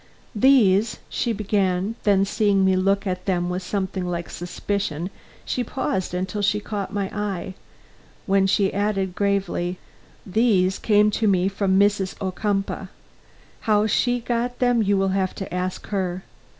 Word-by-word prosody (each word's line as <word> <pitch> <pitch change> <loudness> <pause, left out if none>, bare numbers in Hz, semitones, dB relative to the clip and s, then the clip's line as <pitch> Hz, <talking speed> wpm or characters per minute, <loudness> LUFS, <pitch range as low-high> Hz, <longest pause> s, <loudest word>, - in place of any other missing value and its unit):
"These 220 -3 +4
" - - -32
she 235 - +1
began; 200 -2 0
then, 195 -2 +4
seeing 200 -1 +2
me 190 0 +4
look 195 +2 +1
at 185 0 -3
them 175 -2 0
with 180 +1 -2
something 190 0 -3
like 170 -1 -4
suspicion, 180 -1 -3 0.3
she 250 - -1
paused 190 -7 -2
until 185 +3 -2
she 205 +1 +2
caught 205 -2 -4
my 205 -1 -1
eye, 200 -3 -3 0.7
when 195 0 +3
she 195 0 +2
added 195 -2 0
gravely, 190 -3 -1 0.5
"these 190 -3 +2
came 210 -1 +4
to 220 +1 0
me 185 -2 +3
from 195 -1 +1
Mrs. 200 -2 +2
Ocumpaugh. 195 +1 -2 0.8
How 210 0 +4
she 245 +3 +1
got 240 +1 -2
them 245 -2 +2
you 200 -1 +2
will 195 0 +1
have 190 -1 0
to 195 - -6
ask 180 0 -3
her. 185 -2 -2
195 Hz, 150 wpm, -23 LUFS, 185-210 Hz, 0.8 s, These